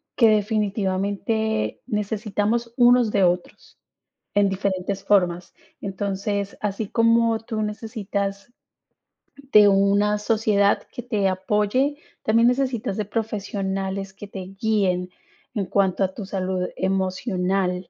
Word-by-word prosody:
que 230 -3 +5
definitivamente 210 +1 0
necesitamos 215 +1 -1
unos 245 -2 +5
de 200 -2 +2
otros 180 0 -1 0.6
en 200 -1 +4
diferentes 195 0 -2
formas. 180 -3 +2 0.3
Entonces, 200 0 -3
así 205 0 -2
como 230 -1 +3
tú 220 -1 -4
necesitas 205 -1 -4 1.0
de 210 -1 +8
una 200 +1 +3
sociedad 210 -2 +2
que - - -5
te 210 -5 0
apoye, 210 +9 0 0.3
también 230 +2 +4
necesitas 250 -6 -1
de 215 - -1
profesionales 195 -3 -3
que 200 +1 -10
te 200 - -8 0.2
guíen 190 -5 +1 0.5
en 200 -3 -1
cuanto 195 0 +1
a 190 0 -1
tu 210 - -6
salud 185 -1 -2
emocional 185 -1 -1
205 Hz, 110 wpm, -23 LUFS, 195-220 Hz, 1.0 s, de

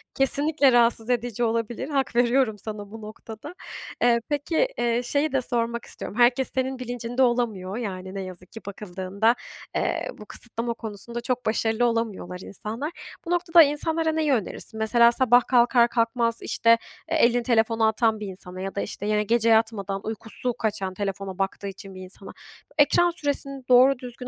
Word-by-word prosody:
kesinlikle 285 +1 +3
rahatsız 235 -1 +3
edici 240 -1 -1
olabilir. 230 +4 -1
Hak 270 -4 -1
veriyorum 240 -2 +3
sana 205 -1 -7
bu 225 0 -9
noktada. 220 +6 -9 0.5
Eee, 240 -1 +4
peki, 315 - +1
eee, 240 +1 +1
şeyi 285 +4 0
de 270 - +1
sormak 235 -1 -2 0.3
herkes 245 +2 +3
senin 260 0 -1
bilincinde 245 0 -3
olamıyor 225 -6 0
yani 190 -5 -5
ne 195 - -3
yazık 185 -1 -10
ki 225 - -9
bakıldığında, 200 +3 -1 0.4
eee, - - -1
bu 210 - -11
kısıtlama 235 +2 -4
konusunda 230 +1 -7
çok 250 0 -2
başarılı 225 +2 +1
olamıyorlar 220 -6 -2
insanlar. 225 - -6 0.3
Bu 335 - -4
noktada 345 -1 +6
insanlara 320 +2 0
neyi 315 -2 +1
önerirsin? 220 -1 -3
Mesela 235 +2 +5
sabah 245 0 +4
kalkar 240 -1 +5
kalkmaz 230 0 0
işte, 230 0 +3 0.3
eee, - - +2
elini 240 0 +3
telefonu 225 -2 +2
atan 220 0 +1
bir 210 - -5
insana 185 -1 -9
ya 195 0 -5
da 200 - -1
işte 205 - -5
yine 210 0 +1
gece 230 +1 +2
yatmadan 215 -3 +1
uykusu 225 +3 -4
kaçan 200 -5 -2
telefona 195 -1 -4
baktığı 195 +1 -2
için 195 0 -9
bir 185 - -9
insana 190 +1 -11 0.5
ekran 345 +4 +4
süresini 280 -4 -3
doğru 255 +1 +6
düzgün 250 -1 -8
235 Hz, 160 wpm, -25 LUFS, 210-250 Hz, 0.5 s, noktada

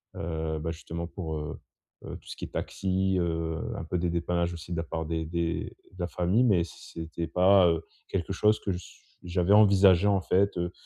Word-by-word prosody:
heu, 80 -1 -3
bah, 80 +2 -3
justement 85 +1 -6
pour, 80 -2 -5
heu 75 0 -5 0.5
heu, - - -6
tout - - -21
ce - - -7
qui - - -5
est - - -10
taxi, 95 0 0
heu, 80 -2 -1 0.2
un - - -4
peu 90 - -2
des 85 0 0
dépannages 85 0 0
aussi 85 +1 -9
de 85 - -2
la 80 - -1
part 80 0 -4
des 80 0 -2
des 85 0 -1 0.3
de - - -17
la 85 - -1
famille 90 +8 +2
mais 95 -7 +4
c'est 80 0 -9
c'était 80 +1 -4
pas, 90 +2 +5
heu, 80 -1 0 0.2
quelque 95 0 -2
chose 105 +3 +3
que 100 - -2
ch 90 0 -8 0.2
j'avais 90 +1 0
envisagé. 100 -2 +6
En 100 -2 +3
fait, 95 +1 +2
heu 85 0 -1
85 Hz, 215 wpm, -28 LUFS, 80-95 Hz, 0.5 s, envisagé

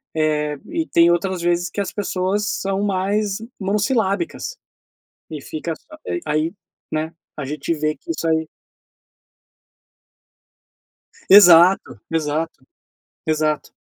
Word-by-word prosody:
eh, 150 -1 0
e 325 -1 -2
tem 170 0 +5
outras 180 +1 0
vezes 175 +1 +1
que 200 - -3
as 195 - -3
pessoas 200 0 -1
são 195 0 -1
mais 200 +1 0 0.2
monossilábicas 210 - -1 0.7
e 155 -3 -6
fica 160 +3 -4
só 310 - -16 0.3
aí 155 +3 0 0.4
né, 155 +1 -2 0.2
a 140 - -4
gente 150 +3 -4
vê 155 0 -1
que 345 - -21
isso 170 - -3
aí 160 -1 +1 2.8
Exato, 175 - +7
exato, 155 -2 -2 0.6
exato. 155 -1 0
170 Hz, 110 wpm, -21 LUFS, 155-200 Hz, 2.8 s, Exato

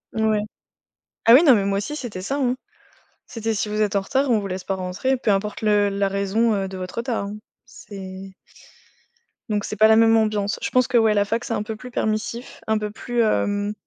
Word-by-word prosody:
N 220 0 +1
ouais. 215 -1 +2 0.8
Ah 230 - +8
oui, 275 +7 +8
non, 270 -7 +7
mais 200 - 0
moi 195 0 0
aussi, 250 +9 -4
c'était 235 -10 -6
ça, 265 +9 -3
hein. 255 -2 +1 0.7
C'était: 225 -1 -3
«Si 210 0 -2
vous 210 +1 -2
êtes 210 -1 +1
en - - +3
retard, 270 +8 0
on 220 - +3
vous 200 - -5
laisse 185 0 -5
pas 195 - -2
rentrer, 190 +8 -1
peu 235 -4 -1
importe 205 +2 -1
le 210 -1 +3
la 200 0 0
raison, 200 +3 +1
heu, 195 -1 -2
de 190 - -8
votre 185 0 -7
retard, 235 -4 -2
hein». 205 +1 -6 0.3
C'est 190 -1 -10 1.2
Donc, 210 -1 0
c'est - - -4
pas 215 +2 +6
la 220 - +6
même 225 0 +5
ambiance. 215 -2 0
Je - - -2
pense 255 -1 +2
que, 245 - +2
ouais, 220 -2 +4
la 205 0 +2
fac 230 +3 -2
c'est 235 - -3
un 210 - -1
peu 220 +1 -5
plus 250 +4 -10
permissif, 220 +2 -3
un 220 0 +2
peu 210 -1 -3
plus, 240 +2 -2
hem 205 -2 0
215 Hz, 235 wpm, -22 LUFS, 200-230 Hz, 1.2 s, Ah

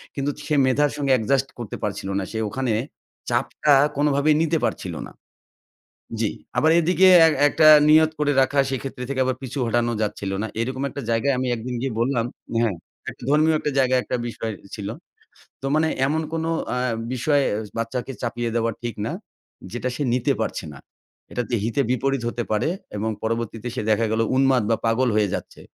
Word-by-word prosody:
কিন্তু 140 0 -1 0.2
সে 150 - +1
মেধার 140 +2 +2
সঙ্গে 140 -2 0
অ্যাডজাস্ট 130 +3 +2
করতে 115 -4 -5
পারছিল 100 -1 -3
না। - - -2
সে 110 - -4
ওখানে 130 +1 -2 0.6
চাপটা 150 - +2 0.2
কোনোভাবেই 145 +1 +3
নিতে 165 0 +2
পারছিল - - -3
না। - - -14 1.1
জি। 110 -2 +1 0.3
আবার 160 - +4
এদিকে 180 +3 +4 0.2
এক 160 - +2
একটা 155 +1 +4 0.2
নিয়ত 155 +1 +6
করে 145 -1 +2
রাখা, 140 +2 +2
সেক্ষেত্রে 135 -1 -4
থেকে 140 -1 -2
আবার 130 0 0
পিছু 130 +1 -6
হটানোও 120 0 +1
যাচ্ছিল 105 -2 -2
না। 110 - -2
এরকম 130 +3 -3
একটা 140 - -6
জায়গায় 115 +5 +2
আমি 130 0 -1
একদিন 120 +2 -5
গিয়ে 135 -2 -2
বললাম 120 -1 +1 0.4
হ্যাঁ, 110 -5 +1 0.3
একটা - - -12
ধর্মীয় 155 +2 +4
একটা 150 - -2
জায়গায় 130 -1 +3
একটা - - -2
বিষয় 115 -1 -4 0.2
ছিল। 100 -2 -6 0.8
তো - - -2
মানে 160 +1 +3 0.2
এমন 155 +3 0
কোনো 165 0 -1 0.2
অ্যা 125 - -1 0.3
বিষয় 140 +3 +2 0.4
বাচ্চাকে 120 +3 -3
চাপিয়ে 120 0 -2
দেওয়া 115 0 +1
ঠিক 120 -2 -3
না - - -2 0.6
যেটা 120 +2 -2
সে 150 - -2
নিতে 125 - +1
পারছে - - -2
না। 70 - -11 0.5
এটাতে 120 0 -2
হিতে 115 +5 0
বিপরীত 135 +1 0
হতে 120 0 -3
পারে 105 +7 +1 0.3
এবং 110 +2 -1
পরবর্তীতে 115 0 -3
সে - - -2
দেখা 110 +1 +3
গেল 110 - +1 0.2
উন্মাদ 135 -2 +4
বা 115 - +3
পাগল 120 +3 +2
হয়ে 105 -1 +3
যাচ্ছে। - - -6
130 Hz, 175 wpm, -23 LUFS, 115-140 Hz, 1.1 s, নিয়ত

